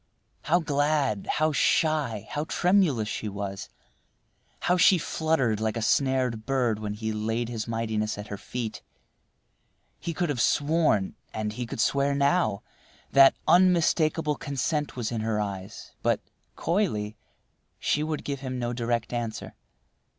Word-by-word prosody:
How 165 +3 +2
glad, 145 - 0
how 155 +1 +2
shy, 145 -7 +1
how 150 +1 -2
tremulous 175 - +2
she 110 -1 -3
was! 100 -1 -5 0.9
How 180 - +2
she 185 +1 +6
fluttered 155 -9 0
like 110 +1 -1
a - - -2
snared 130 -3 +1
bird 125 -5 +1
when 105 -1 -4
he 110 +1 -3
laid 110 +2 -2
his 115 -2 -4
mightiness 110 -2 -2
at 105 +1 -8
her 100 - -5
feet! 120 -3 -5 1.2
He 170 - -4
could 175 -3 0
have 130 -5 0
sworn, 145 - +2 0.2
and 105 -1 -2
he 120 +2 -4
could - - -6
swear 140 +4 +2
now, 140 - +1 0.5
that 135 0 +7
unmistakable 165 -3 +3
consent 145 +2 -2
was 120 -3 -3
in 115 -2 -2
her 110 -1 -1
eyes, 100 0 -5
but, - - +2 0.4
coyly, 160 - -1 0.6
she 150 - 0
would 155 0 -2
give 140 -1 -3
him 130 -1 -4
no 120 -1 -2
direct 120 -1 -2
answer. 115 -2 -4
125 Hz, 145 wpm, -27 LUFS, 110-155 Hz, 1.2 s, that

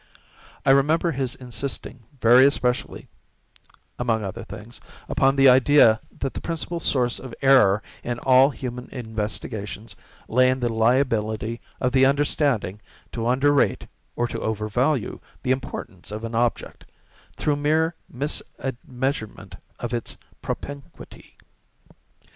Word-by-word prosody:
I 135 - +6
remember 155 +5 +3
his 130 -3 -2
insisting 125 +1 -5 0.2
very 120 +3 +7
especially 125 -3 -1 0.9
(among 115 -3 0
other 95 -2 -5
things) 110 +4 -10 0.3
upon 135 -1 +2
the 135 0 +6
idea 130 -3 +6 0.2
that 135 - -3
the - - -6
principle 170 +1 -3
source 125 -6 +1
of 130 -3 -9
error 110 -7 +5 0.2
in 120 0 -3
all 130 +2 +5
human 125 -3 -6
investigations 110 -2 -5 0.3
lay 130 +2 +4
in 130 0 0
the 120 -2 -1
liability 115 -1 +1 0.2
of 125 - 0
the 135 0 +5
understanding 140 - +1 0.3
to 115 -1 -3
under 135 +4 +3
rate 140 - +1 0.3
or 120 - 0
to - - -5
over 110 -1 -2
value 125 +3 0 0.2
the 130 - 0
importance 115 -8 -4
of 105 +2 -6
an 115 0 -5
object, 120 +1 -1 0.5
through 145 -1 0
mere 160 +3 +1 0.2
misadmeasurement 130 -2 -4 0.2
of 120 0 -4
its 120 -2 -4 0.2
propinquity. 140 -1 -8
125 Hz, 125 wpm, -24 LUFS, 115-135 Hz, 0.9 s, very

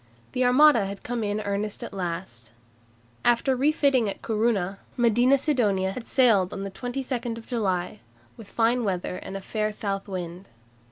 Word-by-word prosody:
The 255 - 0
Armada 250 -4 +5
had 200 0 -7
come 240 -1 -3
in 205 +1 -1
earnest 205 0 -3
at - - -7
last. 170 - -5 0.7
After 240 +3 +3
refitting 275 -4 +2
at - - -7
Corunna, 210 -4 0 0.2
Medina 240 +3 +4
Sidonia 210 -10 +1
had 230 +3 -7
sailed 220 -9 +4
on 195 - -4
22 245 +2 -4
July 205 -5 -2 0.4
with 220 -3 -12
fine 235 +2 +2
weather 180 -2 -2
and 195 - -6
a - - -8
fair 215 +2 -2
south 200 -1 -4
wind. 180 -1 -6
215 Hz, 150 wpm, -26 LUFS, 195-245 Hz, 0.7 s, Armada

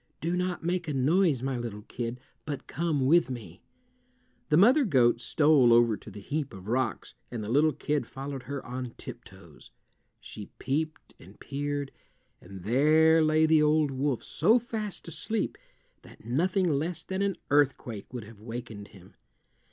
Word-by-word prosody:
Do 170 +2 -1
not 180 -1 -2
make 175 0 -1
a 150 - -2
noise, 145 0 +2
my 135 -2 -2
little 110 -3 -6
kid, 120 +2 -5 0.2
but 145 -2 -5
come 155 -4 -1
with 165 0 +4
me." 105 -8 -8 0.9
The 150 - +4
mother 250 - +6
goat 125 - +3
stole 145 -1 +4
over 115 -1 +5
to 105 - -12
the 105 0 -10
heap 145 +3 -4
of 95 +1 -11
rocks, 125 -2 -1 0.2
and 115 -3 -5
the 105 - -4
little 150 +4 +4
kid 145 -4 -2
followed 135 0 -6
her 140 -1 -4
on 125 -1 -6
tiptoes. - - -12 0.5
She 105 - -9
peeped 155 +4 -3
and 95 +4 -16
peered, 145 0 -3 0.5
and 95 0 -11
there 155 - +4
lay 155 0 +4
the 160 -1 +4
old 150 -1 +3
wolf 135 -1 -1
so 210 +10 +3
fast 220 -6 -5
asleep 215 +6 -2 0.5
that - - -17
nothing 180 - +1
less 160 +2 -1
than 190 +1 -3
an 200 -2 0
earthquake 130 -7 +1
would 120 -2 -6
have 105 0 -14
wakened 115 -3 -7
him. 95 -3 -17
140 Hz, 160 wpm, -28 LUFS, 120-160 Hz, 0.9 s, mother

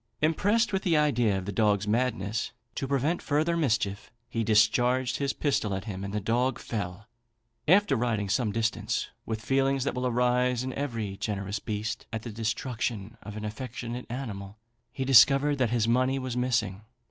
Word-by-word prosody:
Impressed 205 +9 +2
with 190 - +1
the 170 -5 +2
idea 120 -9 +2
of 95 - -4
the 100 - -3
dog's 105 -1 +2
madness, 110 -2 -1 0.2
to 135 - -3
prevent 140 +5 0
further 155 +3 +1
mischief, 105 -9 0 0.2
he 115 -1 -2
discharged 120 +4 +3
his 140 -1 0
pistol 115 -10 0
at 95 - -4
him, 95 -3 -5
and 100 - -4
the 105 - -1
dog 120 +5 +1
fell. 100 -2 -5 0.6
After 195 -1 +5
riding 115 -4 0
some 105 +2 +1
distance 110 +1 -1 0.2
with 110 -1 -4
feelings 135 +1 +2
that 140 - -1
will 125 0 -1
arise 125 0 +2
in 130 0 -4
every 115 -8 -3
generous 100 -1 -3
breast 105 +1 -4
at 110 -1 -4
the 120 - -6
destruction 115 -1 -3
of 105 +1 -8
an 105 - -5
affectionate 120 +2 -5
animal, 105 -5 -6 0.3
he 130 - -3
discovered 135 +3 +6
that 125 -3 +2
his 115 -1 +1
money 130 +3 +2
was 130 -2 -3
missing. 120 -6 0
120 Hz, 170 wpm, -28 LUFS, 105-130 Hz, 0.6 s, discovered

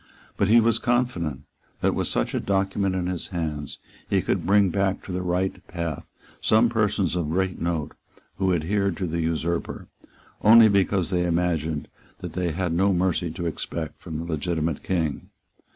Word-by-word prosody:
But 100 - +1
he 115 +3 +6
was 115 0 +3
confident 120 - 0 0.4
that, - - +2
with - - -1
such - - -1
a - - 0
document 95 0 0
in 90 -1 -1
his 90 -2 -2
hands, 80 -6 -4 0.3
he - - +2
could 85 -3 -1
bring 100 -1 +4
back 95 0 0
to - - -7
the 90 0 -2
right 90 +1 0
path 85 -4 -4 0.3
some 110 +2 +4
persons 105 -6 +1
of 85 -4 -1
great 95 +2 -1
note 85 -3 -1 0.5
who 95 -1 +1
adhered 95 +2 0
to 95 - -2
the 85 0 -2
usurper, 85 +1 -2 0.5
only 110 +1 +8
because 100 -2 +2
they 90 -1 +1
imagined 80 -3 0 0.3
that - - -7
they 90 -2 -1
had 85 +1 -1
no 95 +3 +3
mercy 90 -1 +1
to 85 +2 -5
expect 80 -1 -4
from 80 - -6
the 80 - -4
legitimate 80 -1 -2
King. 80 -6 -2
90 Hz, 170 wpm, -25 LUFS, 80-100 Hz, 0.5 s, only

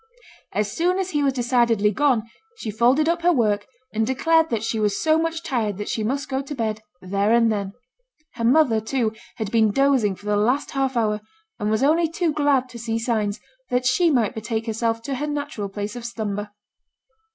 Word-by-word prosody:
As 210 -1 -1
soon 355 - +1
as 380 -1 -2
he 295 - 0
was 275 -2 +2
decidedly 235 -4 +2
gone, 255 -1 +2 0.3
she 220 - -4
folded 245 +8 +3
up 340 +1 +1
her 350 +1 +4
work, 210 -8 +1 0.3
and 220 +1 +1
declared 325 +5 +3
that 225 -4 -1
she 225 -1 -1
was 210 -2 +1
so 315 0 +3
much 330 +1 -2
tired 230 - -1
that 210 - -5
she 220 - -1
must 275 +6 -2
go 265 -1 -1
to 280 +2 -7
bed 220 -3 -2 0.2
there 200 +3 0
and 230 -1 +4
then. 200 -2 -3 0.6
Her 230 - -5
mother, 245 -3 +4
too, 225 -1 -1 0.2
had 215 -3 -4
been 220 -2 +4
dozing 255 -4 +2
for 205 - -17
the 210 0 +1
last 245 +8 +1
half 270 -2 -1
hour, 210 -2 +1 0.4
and 210 -1 -1
was 220 +4 +1
only 320 +3 +3
too 330 -1 0
glad 285 -3 +2
to 235 -1 -9
see 225 0 -2
signs 220 -3 -1 0.3
that 250 0 0
she 330 +7 +3
might 240 -8 +2
betake 220 0 -3
herself 230 0 -1
to 275 - -3
her 290 +3 -2
natural 290 -8 -4
place 205 +3 -5
of 245 - -7
slumber. 210 -3 -4
235 Hz, 205 wpm, -23 LUFS, 215-280 Hz, 0.6 s, her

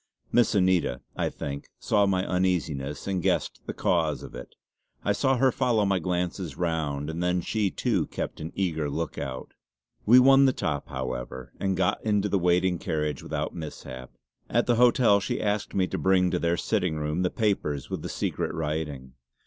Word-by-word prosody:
Miss 120 -2 +3
Anita, 90 -9 +2
I - - 0
think, 70 0 -6
saw 105 -2 +2
my 95 -1 +1
uneasiness 85 -7 -1
and 95 -2 -1
guessed - - 0
the - - -3
cause - - +1
of - - -10
it; 60 - -10 0.5
I 100 - +3
saw 135 +4 +2
her 130 +1 +4
follow 120 -5 +1
my 95 -1 +2
glances 90 -1 -2
round, 80 -5 -1
and 80 +2 -4
then 90 0 +1
she 105 +3 0
too - - 0
kept - - -5
an 80 +2 -5
eager 80 -6 -1
look 80 +3 -3
out. 65 -1 -6 0.5
We 120 +4 +8
won 135 +2 +7
the 130 - +4
top, 70 - -2
however, 65 -1 -5
and 95 -2 0
got 95 +2 +1
into 105 -1 +1
the 100 - +2
waiting 90 0 +2
carriage 75 -1 -2
without - - -3
mishap. 65 -6 -8 0.4
At 120 +1 +2
the 120 -2 +2
hotel 120 -4 +5
she 100 - -2
asked 105 0 -1
me 95 - +3
to - - -3
bring 95 -1 +3
to - - 0
their 85 +1 +1
sitting 90 -6 0
room 75 +3 -1
the 90 - +2
papers 90 - -1
with - - -3
the - - -5
secret - - -2
writing. 75 -5 -3
90 Hz, 185 wpm, -27 LUFS, 75-100 Hz, 0.5 s, We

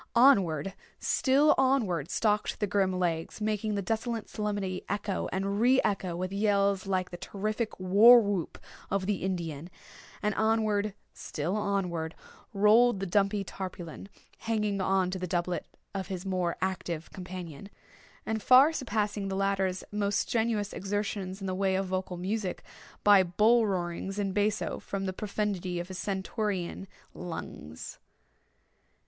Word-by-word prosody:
Onward—still 235 - +3
onward 215 - +2
stalked 210 0 0
the 210 - +1
grim 195 -2 +1
Legs, 170 -1 -2
making 215 0 -1
the 200 - -1
desolate 225 +3 -2
solemnity 205 -3 -3
echo 200 0 -2
and 195 +2 -1
re 255 +2 +5
echo 190 -4 -1
with 185 +2 -3
yells 200 -1 +2
like 185 -2 -1
the 175 - -6
terrific 215 +4 -3
war 205 +7 +8
whoop 200 -6 -2 0.3
of 195 -1 0
the 205 0 0
Indian; 170 -4 -3 0.5
and 210 0 +1
onward, 215 -2 +1 0.2
still 165 +6 -3
onward 180 -6 -1 0.4
rolled 210 +2 +5
the 195 - -2
dumpy 200 +2 +1
Tarpaulin, 185 -1 -7 0.3
hanging 210 -3 -1
on 190 -1 +1
to 185 - -3
the 180 - -3
doublet 175 +1 -2 0.3
of 190 -2 -3
his 190 -1 -5
more 180 -3 -1
active 175 -4 -3
companion, 180 -2 -8 0.6
and 220 -1 -2
far 265 +7 +7
surpassing 210 -7 -1
the 190 - -2
latter's 195 -1 0
most 205 -1 +1
strenuous 220 -3 0
exertions 200 -1 -3
in - - -4
the 185 - -2
way 190 0 +1
of 195 +1 0
vocal 185 -1 -3
music, 190 +1 -3 0.4
by 205 -2 +7
bull 215 +6 +3
roarings 185 +1 -3
in 200 -2 -1
basso, 205 +1 0
from 195 -1 -4
the 190 - -2
profundity 195 -3 -2
of 175 +2 -6
his 185 -1 -6
stentorian 195 -1 -3 0.3
lungs. 80 - -7
195 Hz, 140 wpm, -29 LUFS, 185-210 Hz, 0.6 s, war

